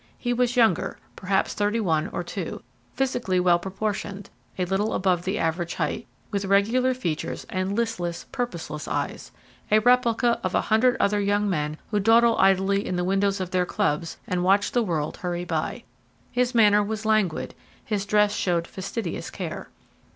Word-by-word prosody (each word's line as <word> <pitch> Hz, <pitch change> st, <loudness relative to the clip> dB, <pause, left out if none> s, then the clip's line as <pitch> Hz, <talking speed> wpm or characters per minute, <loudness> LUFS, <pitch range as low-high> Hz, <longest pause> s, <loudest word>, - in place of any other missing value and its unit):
He 245 Hz, -1 st, -1 dB
was 245 Hz, 0 st, +1 dB
younger, 225 Hz, -8 st, +2 dB, 0.2 s
perhaps 190 Hz, +1 st, 0 dB
thirty 210 Hz, +2 st, 0 dB
one 160 Hz, -7 st, +1 dB
or -, -, -4 dB
two, -, -, -5 dB, 0.3 s
physically 245 Hz, -8 st, 0 dB
well 175 Hz, -1 st, +4 dB
proportioned, 200 Hz, +1 st, -4 dB, 0.3 s
a 180 Hz, -, 0 dB
little 195 Hz, +4 st, 0 dB
above 180 Hz, -2 st, +1 dB
the 190 Hz, +2 st, -1 dB
average 165 Hz, +1 st, -1 dB
height, -, -, -2 dB, 0.2 s
with 200 Hz, -1 st, -1 dB
regular 230 Hz, +7 st, +3 dB
features 170 Hz, -11 st, -3 dB
and 185 Hz, +1 st, -1 dB
listless, 180 Hz, -7 st, -2 dB
purposeless 170 Hz, -11 st, -4 dB
eyes -, -, -3 dB, 0.4 s
a 215 Hz, -, +5 dB
replica 240 Hz, 0 st, +3 dB
of -, -, -1 dB
a -, -, +3 dB
hundred 245 Hz, +4 st, +3 dB
other 205 Hz, +1 st, +2 dB
young 205 Hz, +1 st, +1 dB
men 150 Hz, -5 st, -1 dB
who 210 Hz, -, +2 dB
dawdle 230 Hz, +3 st, +5 dB
idly 195 Hz, +1 st, +3 dB
in 185 Hz, -, -3 dB
the 180 Hz, -, 0 dB
windows 195 Hz, +2 st, +1 dB
of 185 Hz, -1 st, -4 dB
their 185 Hz, -1 st, +2 dB
clubs 165 Hz, -6 st, -1 dB
and 180 Hz, -1 st, -1 dB
watch 200 Hz, +2 st, +3 dB
the 245 Hz, -, +2 dB
world 160 Hz, -8 st, -2 dB
hurry 175 Hz, -1 st, -3 dB
by. -, -, -3 dB, 0.5 s
His 250 Hz, 0 st, 0 dB
manner 210 Hz, -2 st, +6 dB
was 215 Hz, +1 st, -4 dB
languid; 215 Hz, -6 st, +1 dB, 0.3 s
his 210 Hz, -3 st, -1 dB
dress 210 Hz, 0 st, +3 dB
showed 170 Hz, -2 st, 0 dB
fastidious 190 Hz, 0 st, -5 dB
care. -, -, -6 dB
200 Hz, 165 wpm, -25 LUFS, 180-220 Hz, 0.5 s, manner